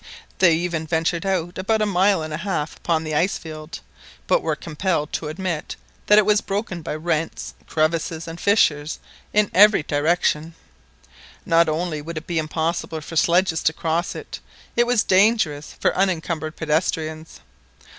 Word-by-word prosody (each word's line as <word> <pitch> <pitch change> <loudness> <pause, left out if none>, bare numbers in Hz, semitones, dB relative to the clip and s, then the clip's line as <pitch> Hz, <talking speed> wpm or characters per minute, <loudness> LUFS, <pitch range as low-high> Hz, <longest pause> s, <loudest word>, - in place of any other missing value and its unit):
They 170 -4 +6
even 165 -1 -2
ventured 165 +3 0
out 180 -1 -1
about 220 +4 +1
a 215 - +2
mile 195 -2 +2
and 155 -1 -5
a - - -2
half 165 -5 -3
upon 165 -2 -1
the 155 -1 -4
ice 170 +6 +1
field, 155 0 -9 0.4
but - - +2
were - - -1
compelled 160 -1 -2
to 155 - -2
admit 165 0 -4 0.3
that 210 - +6
it 215 - +6
was 210 0 +3
broken 195 -4 -3
by 150 - -4
rents, 160 0 -2
crevasses, 160 +1 -1
and 165 +1 -8
fissures 155 -7 +2 0.3
in 210 -1 +2
every 205 -3 +6
direction. 160 +1 0 0.9
Not 165 0 +4
only 155 -1 -2
would 165 +2 -7
it 155 - -6
be 170 -2 -1
impossible 160 +1 -2
for 165 - -9
sledges 170 0 +3
to 160 - +2
cross 165 +2 -2
it, - - -8 0.4
it 240 0 +3
was 245 -3 +3
dangerous 185 -7 +2
for - - +1
unencumbered 165 -4 -1
pedestrians. 160 0 -2
165 Hz, 160 wpm, -22 LUFS, 155-185 Hz, 0.9 s, They